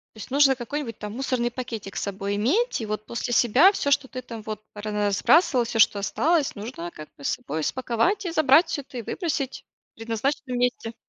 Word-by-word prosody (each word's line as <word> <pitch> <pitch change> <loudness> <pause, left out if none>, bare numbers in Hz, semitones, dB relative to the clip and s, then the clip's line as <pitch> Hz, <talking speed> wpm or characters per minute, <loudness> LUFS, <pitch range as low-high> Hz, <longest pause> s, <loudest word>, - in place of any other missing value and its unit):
То - - -14
есть 220 - -9
нужно 275 -1 +5
какой-нибудь 245 -1 -5
там 210 0 -7
мусорный 250 -2 -1
пакетик 230 -5 -6
с - - -2
собой 200 0 -3
иметь, 320 - +1
и 220 - -4
вот 215 0 -4
после 240 +2 -4
себя 265 - +6
всё, 285 -7 -1
что 275 -1 +3
ты 255 0 -7
там 230 -3 -8
вот 215 0 -6
разбрасывал, 210 - +2
всё, 225 -1 -1
что 205 - +5
осталось, 305 +9 +1
нужно 200 -5 -7
как 155 0 -10
бы 140 - -13
с - - +1
собой 155 +1 -3
спаковать 260 - 0
и 345 - -2
забрать 310 +1 +5
всё 315 -4 -3
это, 255 -2 -9
и - - -4
выбросить 285 - -3 0.3
в - - -72
предназначенном 245 +3 -2
месте. 245 -2 -1
240 Hz, 205 wpm, -25 LUFS, 215-280 Hz, 0.3 s, себя